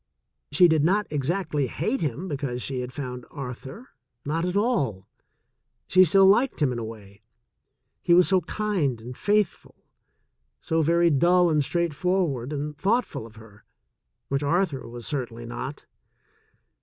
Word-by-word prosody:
She 160 +5 +6
did 160 -3 +2
not 200 +6 +2
exactly 150 -1 -1
hate 240 - -2
him 155 +4 -3
because 135 -5 -3
she 130 -2 -3
had 125 0 -5
found 125 -3 -6
Arthur 135 - -8 0.2
— 120 0 -53
not 165 +4 -1
at 180 +2 -1
all. 140 - 0 0.8
She 185 0 +6
still 195 +4 +5
liked 235 +7 +3
him 145 -5 +2
in 120 - -3
a - - -4
way 105 -2 -10 0.4
— - - -53
he - - -1
was 180 0 +6
so 190 -2 +3
kind 175 - -1
and 120 +3 -9
faithful, 205 +2 0 0.8
so 160 0 0
very 170 +2 +3
dull 175 +4 +4
and 150 -2 +2
straightforward 170 -4 -1
and 150 0 -4
thoughtful 200 - -1
of 110 - -18
her, 110 -2 -16 0.6
which 140 +1 -1
Arthur 155 -1 0
was 120 0 -8
certainly 120 -4 -4
not. 130 +4 -6
150 Hz, 155 wpm, -25 LUFS, 125-180 Hz, 0.8 s, She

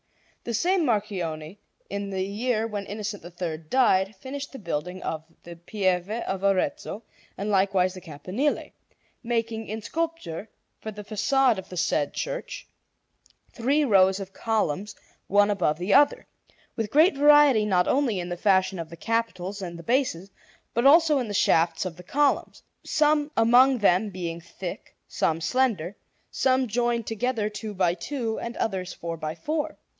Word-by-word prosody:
The 235 - -2
same 360 - +2
Marchionne, 190 - -2 0.3
in 200 0 -4
the 190 -1 -2
year 220 +3 -1
when 205 -3 -5
Innocent 205 -1 -5
III 170 -2 -5
died, 190 +2 +2
finished 275 +7 -7
the 270 - -8
building 180 - -4
of 160 -1 -3 0.2
the 170 0 -9
Pieve 180 +1 -1
of 205 -4 -3
Arezzo 210 +4 0 0.3
and 205 +2 -2
likewise 190 -2 +2
the 185 - -10
campanile, 185 - -2 0.5
making 230 -2 -2
in 215 +1 -5
sculpture, 320 - -4 0.3
for 220 - -6
the 210 -1 -8
façade 225 +3 +2
of 190 - -10
the 180 - -8
said 145 -3 0
church, - - -5 0.9
three 280 +5 +1
rows 190 -4 +4
of 195 -1 -8
columns 210 -3 -1 0.3
one 205 +1 +4
above 180 -7 +1
the 180 +4 0
other, 285 0 +4 0.5
with 225 -2 -2
great 310 - +5
variety 290 -5 +6
not 185 -4 +2
only 255 -8 +1
in 175 0 -4
the 175 - -2
fashion 190 -1 +2
of 165 -1 -5
the 170 - -10
capitals 205 -4 -2
and 175 -2 -6
the 170 - -10
bases 200 -6 0 0.4
but 235 +3 +3
also 310 -1 +6
in 245 - -2
the 205 - -4
shafts 170 0 +2
of 180 -2 -4
the - - -10
columns, 285 +8 0 0.2
some 300 -1 +2
among 245 +4 +6
them 205 -1 +3
being 170 -3 -5
thick, 170 +2 -8
some 160 0 0
slender, 195 -1 0 0.4
some 260 0 +2
joined 235 +1 0
together 225 0 -1
two 210 0 -6
by 180 -2 +2
two, 225 +5 -3
and 235 0 -6
others 190 -4 -2
four 170 0 -5
by 155 0 -5
four. 300 - -3
205 Hz, 160 wpm, -26 LUFS, 180-250 Hz, 0.9 s, variety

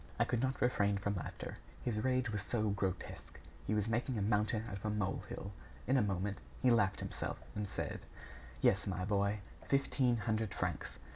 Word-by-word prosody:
I - - +5
could 120 - +1
not 130 0 0
refrain 100 -5 +3
from 100 +1 0
laughter, 95 - -5 0.3
his 110 -3 0
rage 130 -2 +2
was 105 -2 -1
so 110 +1 0
grotesque. 95 -2 -3 0.3
He 105 - +2
was 105 0 +1
making 120 +2 +1
a - - 0
mountain 105 +1 +2
out 100 - -4
of 100 - -9
a - - +2
molehill. 100 -1 -2 0.3
In 130 - +3
a 130 - +6
moment, 100 -1 0 0.2
he 130 - +5
laughed 105 -5 +3
himself, - - -3 0.2
and 105 -1 -2
said: - - -3 0.6
"Yes, 100 +2 +4
my 90 -1 -1
boy, 100 +1 +2 0.3
fifteen 135 -3 +3
hundred 110 -1 0
francs. 90 -5 -2
105 Hz, 185 wpm, -36 LUFS, 100-120 Hz, 0.6 s, a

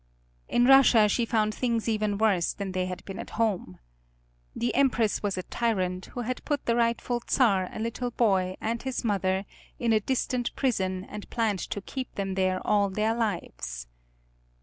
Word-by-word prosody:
In 240 - +3
Russia 255 -5 +7
she 230 +3 0
found 215 -2 +1
things 235 -2 -1
even 215 -2 0
worse 200 -5 +2
than 200 -2 -5
they 185 0 -1
had 180 0 -6
been 195 - -7
at - - -6
home. 200 - 0 0.8
The 240 +1 -1
Empress 240 -6 +2
was 200 -2 -1
a 185 - -3
tyrant 185 -6 -1
who 245 - -6
had 250 +2 -4
put 290 -2 -2
the 235 - +2
rightful 235 +1 0
Czar, 195 -8 +3
a - - -8
little 230 +3 -2
boy, 190 -6 +1
and 230 +1 -2
his 260 -1 -3
mother, 195 -3 0 0.3
in 235 -2 +1
a 215 - +4
distant 250 +1 -1
prison, 190 -8 0
and 210 -1 -8
planned 220 -5 0
to 200 - -3
keep 260 +5 -6
them 195 -1 -2
there 185 -1 0
all 205 -1 +3
their 215 +3 0
lives. 170 - -3
215 Hz, 175 wpm, -27 LUFS, 190-235 Hz, 0.8 s, Russia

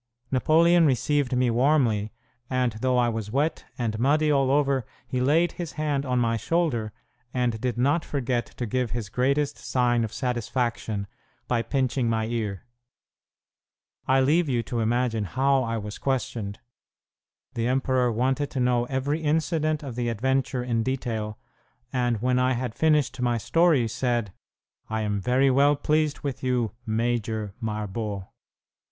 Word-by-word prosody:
Napoleon 165 +5 +4
received 135 0 +1
me 125 -1 +2
warmly, 120 -5 +2 0.4
and 125 -2 +1
though 130 -1 +2
I 120 -1 +3
was 110 -3 -3
wet 145 +7 -1
and 110 -3 -2
muddy 150 +4 +3
all 135 -2 +3
over, 140 -2 +2 0.2
he 125 +1 -2
laid 160 +6 +3
his 175 -3 -6
hand 145 -3 -1
on 125 0 +1
my 115 -1 +1
shoulder, 120 -5 0 0.4
and 120 -3 0
did 125 -2 -1
not 140 +7 +2
forget 125 -4 -1
to 120 - -5
give 125 +2 -1
his 110 -3 -4
greatest 140 +4 0
sign 120 -2 +1
of 110 - -3
satisfaction 120 -4 -2 0.4
by 120 -2 +1
pinching 130 -1 0
my 110 -1 0
ear. 110 -3 -3 1.4
I 130 0 +4
leave 155 +4 +3
you 120 -3 +1
to 120 +1 -3
imagine 115 -1 0
how 135 +6 +2
I 115 -2 -2
was 105 -1 -6
questioned! 125 -6 -2 1.0
The 115 0 -1
emperor 130 -1 +1
wanted 130 +5 0
to 135 - -4
know 125 -1 +2
every 135 +5 -1
incident 155 0 0
of 135 -4 -5
the 120 0 -1
adventure 130 +2 0
in 120 -2 0
detail, 110 -4 -3 0.6
and 120 -3 +1
when 125 0 +2
I 130 +1 +2
had 120 -2 -3
finished 150 -4 +1
my 120 -1 +1
story 160 0 +3
said, 115 -3 -1 0.6
"I 110 0 -1
am 105 -1 -1
very 130 +6 +3
well 140 +2 +4
pleased 150 +1 0
with 140 -3 -4
you, 125 -4 0 0.2
'Major' 110 -2 -1
Marbot." 105 -2 -3
125 Hz, 150 wpm, -26 LUFS, 115-140 Hz, 1.4 s, Napoleon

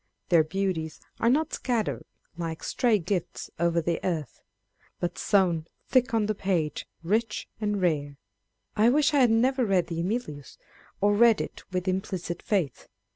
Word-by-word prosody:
Their 170 -3 +6
beauties 165 -2 -2 0.2
are 230 - +3
not 300 +5 +1
"scattered 235 -4 -1 0.3
like 165 -2 -5
stray 235 -4 +2
gifts 180 -1 -3
o'er 170 0 +2
the 170 0 -1
earth," 160 -8 -3 0.6
but 175 0 -2
sown 175 -5 +2 0.2
thick 255 -1 +3
on 225 -2 +2
the 215 - 0
page, 185 -7 -1 0.2
rich 215 +5 0
and 210 -2 -1
rare. 145 -6 0 0.6
I 220 +3 +5
wish 295 +3 +3
I 290 - +4
had 250 -3 +5
never 255 +4 +3
read 195 -5 +2
the 165 -1 -3
Emilius, 170 - -4 0.4
or 205 +1 +4
read 225 0 +5
it - - -5
with 185 0 -2
implicit 185 -2 -2
faith. 185 -10 -1
190 Hz, 155 wpm, -27 LUFS, 170-225 Hz, 0.6 s, Their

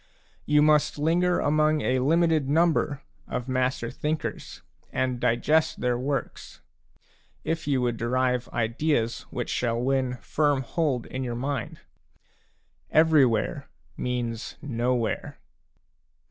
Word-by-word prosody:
You 150 0 +4
must 150 -1 +3
linger 175 +4 +2
among 155 +1 +2
a 130 0 +1
limited 160 0 +2
number 155 -2 +2 0.2
of 125 0 -4
master 130 -2 -1
thinkers, 155 +1 -4 0.3
and 130 -1 -1
digest 155 +8 +2
their 125 -1 +1
works, 135 +3 -4 0.8
if 160 -2 -3
you 135 -3 +1
would 120 -2 0
derive 125 +1 0
ideas 120 +1 -1
which - - -4
shall 115 -1 0
win 130 0 0
firm 140 +5 0
hold 140 -3 -1
in 130 0 -5
your 120 -2 -3
mind. 130 -1 -4 1.1
Every 155 -4 +5
where 115 +5 -2 0.3
means 120 -2 -3
nowhere. 120 -3 -2
130 Hz, 115 wpm, -26 LUFS, 125-150 Hz, 1.1 s, Every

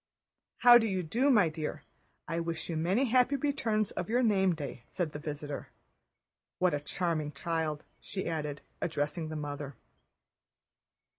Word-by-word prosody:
"How 240 0 +10
do 225 - +1
you 190 -3 -1
do, 240 - +2
my 210 -10 +6
dear? 155 -1 -4 0.4
I 165 +2 -1
wish 165 0 -3
you - - -2
many 185 +11 +2
happy 255 +2 +3
returns 230 -7 0
of 175 - -4
your 245 +3 +3
name 190 -5 +3
day," 145 -5 -6
said 175 -4 -2
the 150 - -6
visitor. 145 -1 -5 0.9
"What 180 -3 +2
a 145 - +1
charming 155 -1 -2
child," 160 0 -2 0.2
she 190 - -5
added, 150 -3 -3 0.2
addressing 155 0 -1
the 155 - -5
mother. 145 -2 -5
165 Hz, 150 wpm, -31 LUFS, 150-215 Hz, 0.9 s, How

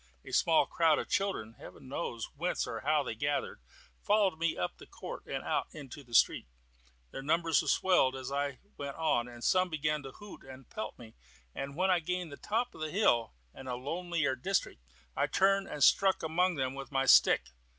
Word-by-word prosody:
A - - -9
small 165 -2 +4
crowd 165 -2 +3
of - - -4
children 195 - -1
(Heaven - - -12
knows 125 -4 -4
whence 175 +5 -1
or - - -5
how 150 +1 +1
they 125 - -4
gathered) 145 - -2 0.4
followed 205 -6 +2
me 165 -1 0
up 90 - -3
the - - -13
court - - -9
and - - -4
out - - -1
into 145 -1 -9
the 120 -2 -7
street. - - +4 0.6
Their - - -6
numbers 165 +3 +2
swelled 175 -9 +3
as 130 0 -6
I 140 -1 -2 0.2
went 140 -1 -5
on, 150 -7 +1
and 120 -1 -11
some 185 -1 +3
began 150 -1 -1
to 135 -1 -9
hoot 205 -1 -12
and 130 -1 -12
pelt 110 - -6
me; 115 -2 -13 0.4
but 140 0 -5
when 185 +3 +2
I 180 - +4
gained 180 0 -3
the 140 - -8
top 230 +4 -2
of - - -12
the 155 - -2
hill, 135 - +2 0.2
and 130 - -9
a 125 - -2
lonelier 155 +1 -1
district, 190 - -2 0.3
I - - +1
turned 195 0 +2
and 145 - -2
struck 190 -3 +4
among 175 +3 +1
them 130 -2 -1
with 135 +1 -8
my 135 -1 +1
stick. - - +5
150 Hz, 200 wpm, -31 LUFS, 130-180 Hz, 0.6 s, stick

